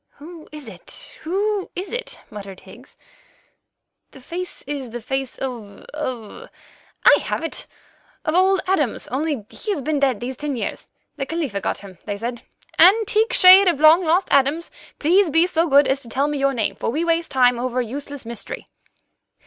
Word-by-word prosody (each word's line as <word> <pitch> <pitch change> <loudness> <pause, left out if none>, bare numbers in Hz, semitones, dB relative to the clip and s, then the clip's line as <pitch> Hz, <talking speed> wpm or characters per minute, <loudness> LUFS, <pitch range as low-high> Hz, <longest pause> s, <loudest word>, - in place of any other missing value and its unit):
"Who 320 +2 -12
is 300 -4 -9
it? 185 -5 -7
Who 400 +4 -1
is 370 +3 -5
it?" - - -5
muttered 195 -2 -9
Higgs. 240 +8 -16 1.1
"The 270 - -15
face 350 +7 -6
is 275 -3 -5
the 240 +2 -6
face 265 +2 -4
of—of—I 245 0 -2
have - - -3
it—of 315 -1 -7
old 375 +2 +3
Adams, 310 - 0
only 275 -3 -2
he's 400 -11 -4
been 305 0 0
dead 265 -6 +1
these 250 +1 -5
ten 290 -1 -3
years. 235 - -5 0.3
The 270 -1 -3
Khalifa 285 -12 -3
got - - -2
him, 185 -4 -13
they 205 -1 -4
said. 235 +2 -5 0.4
Antique 430 +5 +5
shade 370 +2 +8
of 340 -4 +3
the 300 - -6
long 320 +4 +7
lost 350 +3 +2
Adams, 280 +5 +2 0.3
please 355 +4 +3
be 325 +3 +4
so 340 -2 +1
good 280 -1 +5
as 270 +1 0
to 235 - -10
tell 275 +5 0
me 295 -1 -2
your 275 0 +1
name, 210 -4 0
for - - -3
we 310 +8 -1
waste 335 0 0
time 250 -2 +3
over 255 0 -2
a 250 - 0
useless 280 +2 -7
mystery." 235 - -6
285 Hz, 175 wpm, -21 LUFS, 245-340 Hz, 1.1 s, shade